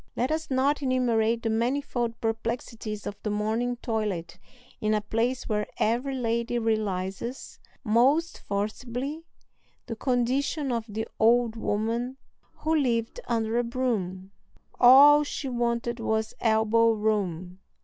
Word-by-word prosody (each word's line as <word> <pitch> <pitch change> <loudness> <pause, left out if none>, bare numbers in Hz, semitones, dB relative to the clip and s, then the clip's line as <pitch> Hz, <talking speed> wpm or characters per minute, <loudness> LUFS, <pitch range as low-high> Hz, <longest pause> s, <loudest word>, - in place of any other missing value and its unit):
Let 250 +5 0
us 315 0 -2
not 275 +2 +1
enumerate 235 -4 +1
the 225 - 0
manifold 240 0 -1
perplexities 225 -1 -3
of 205 0 -6
the 215 - -3
morning 220 +4 -1
toilet 190 -7 -3 0.4
in 215 0 +1
a 210 - 0
place 230 +4 -1
where 210 -2 -1
every 245 +5 0
lady 235 -1 -1
realizes 215 +1 -2 0.2
most 270 +9 +2
forcibly 245 +9 -4 0.6
the 230 - -5
condition 260 +4 0
of 230 -2 -1
the 220 +2 -4
old 235 0 +4
woman 230 +4 -2 0.4
who 320 +1 -1
lived 240 - 0
under 225 0 0
a - - +1
broom: 210 -7 -2 0.5
"All 285 +4 +8
she 285 -1 -5
wanted 235 -1 -1
was 220 -1 -1
elbow 225 0 +3
room." 190 -5 -2
230 Hz, 125 wpm, -27 LUFS, 220-255 Hz, 0.6 s, All